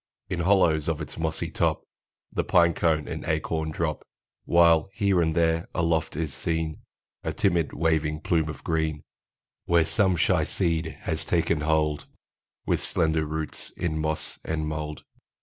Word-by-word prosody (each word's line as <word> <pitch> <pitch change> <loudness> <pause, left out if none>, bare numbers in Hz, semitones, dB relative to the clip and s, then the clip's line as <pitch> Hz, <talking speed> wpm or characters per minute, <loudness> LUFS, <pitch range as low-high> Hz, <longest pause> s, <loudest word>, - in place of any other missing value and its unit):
In 90 - -2
hollows 85 -4 +3
of 80 -2 -1
its 80 +1 -7
mossy 80 0 -2
top - - 0 0.5
The - - 0
pine 85 -1 +4
cone 80 -3 +1
and - - -5
the - - -5
acorn 80 0 -2
drop; 80 -1 -2 0.4
While, 85 0 +5
here 100 -2 +2
and 80 -1 +1
there, 80 0 +2
aloft 80 -3 0
is 80 -3 -2
seen 80 -2 -2 0.4
A - - -1
timid, 85 -5 +1
waving 80 -1 0
plume 80 -1 +1
of 75 - -7
green, 80 -2 -1 0.6
Where 85 -2 +4
some 95 0 +2
shy 85 0 +2
seed 80 -1 -1
has 80 -2 -2
taken 80 -1 +1
hold 75 -1 +1 0.6
With - - +1
slender 80 -1 +1
roots 80 0 -5
in 80 -3 -1
moss 80 -1 -3
and 80 -1 -2
mold. 75 0 -4
80 Hz, 155 wpm, -26 LUFS, 80-85 Hz, 0.6 s, While